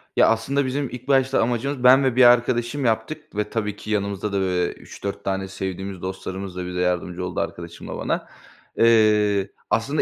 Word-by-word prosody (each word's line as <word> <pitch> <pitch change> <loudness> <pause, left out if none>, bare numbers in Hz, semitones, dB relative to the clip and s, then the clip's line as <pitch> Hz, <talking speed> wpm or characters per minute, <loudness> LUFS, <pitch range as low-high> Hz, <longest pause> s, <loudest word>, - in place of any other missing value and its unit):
Ya, - - +5
aslında 130 +5 +1
bizim 135 +1 -2
ilk 125 +2 -9
başta 135 -1 +3
amacımız 125 +3 -1
Ben 130 +2 +7
ve 130 -2 +1
bir 130 - +6
arkadaşım 120 +2 +3
yaptık 110 +3 -2
ve 105 0 -1
tabii 105 -3 -2
ki 105 - -8
yanımızda 100 0 -1
da, 100 - +1
böyle, 90 -2 0
3-4 100 0 -7
tane 95 0 -2
sevdiğimiz 95 0 -5
dostlarımız 95 0 -5
da 90 -1 -4
bize 90 0 -4
yardımcı 90 0 -1
oldu 90 - -4
arkadaşımla 85 0 -6
bana. - - -2 0.5
Eee, 105 -3 +4 0.2
aslında 140 +7 +1
105 Hz, 175 wpm, -23 LUFS, 95-125 Hz, 0.5 s, Ben